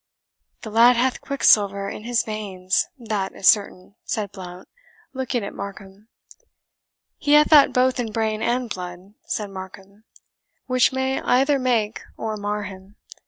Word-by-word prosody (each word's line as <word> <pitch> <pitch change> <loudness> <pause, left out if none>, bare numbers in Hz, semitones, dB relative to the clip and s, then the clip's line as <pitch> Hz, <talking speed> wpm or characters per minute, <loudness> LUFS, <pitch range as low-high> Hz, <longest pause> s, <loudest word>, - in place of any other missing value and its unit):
"The 220 - -7
lad 235 +3 +6
hath 250 +2 0
quicksilver 200 -7 +3
in 210 - -7
his 240 0 +1
veins, 190 -4 -2
that 215 -6 -3
is 190 - -1
certain," 200 -2 +2
said 205 -3 -3
Blount, 185 -2 -10 0.5
looking 260 -3 -2
at 200 - -6
Markham. 200 +1 -9 1.1
"He 290 - +1
hath 300 +1 +5
that 295 -3 +7
both 255 0 +2
in 230 -3 -2
brain 220 0 -1
and 245 +1 0
blood," 180 -1 -8
said 205 -2 -3
Markham, 195 +2 -11 0.6
"which 255 0 +3
may 265 0 -1
either 275 +3 +2
make 230 -4 0 0.2
or 220 -1 -3
mar 205 0 -3
him. 190 0 -11
215 Hz, 145 wpm, -22 LUFS, 195-250 Hz, 1.1 s, that